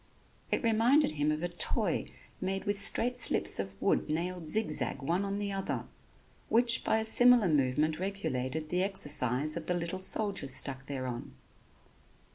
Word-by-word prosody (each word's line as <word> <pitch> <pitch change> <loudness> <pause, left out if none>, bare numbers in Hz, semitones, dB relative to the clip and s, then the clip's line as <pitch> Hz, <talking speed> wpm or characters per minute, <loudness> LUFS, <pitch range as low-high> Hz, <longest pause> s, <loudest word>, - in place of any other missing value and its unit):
It - - -1
reminded 230 - +3
him 150 0 -1
of 155 +2 -3
a - - 0
toy 175 0 0 0.3
made 195 +1 -2
with 205 -1 -1
straight 245 +4 +1
slips - - +2
of 95 0 -6
wood - - 0
nailed 170 +1 -3
zigzag 210 -2 -1
one 175 +7 0
on 200 0 -3
the 205 -1 -3
other, 195 -1 -4 0.6
which 235 0 +3
by - - +1
a 220 - -1
similar 245 -1 +6
movement 150 +1 0
regulated 155 -6 -4
the 180 +2 0
exercise 150 - 0
of 170 -2 -6
the 180 - 0
little 175 +2 -4
soldiers 190 -9 +1
stuck 135 0 +1
thereon. 130 -3 -6
175 Hz, 155 wpm, -30 LUFS, 150-205 Hz, 0.6 s, similar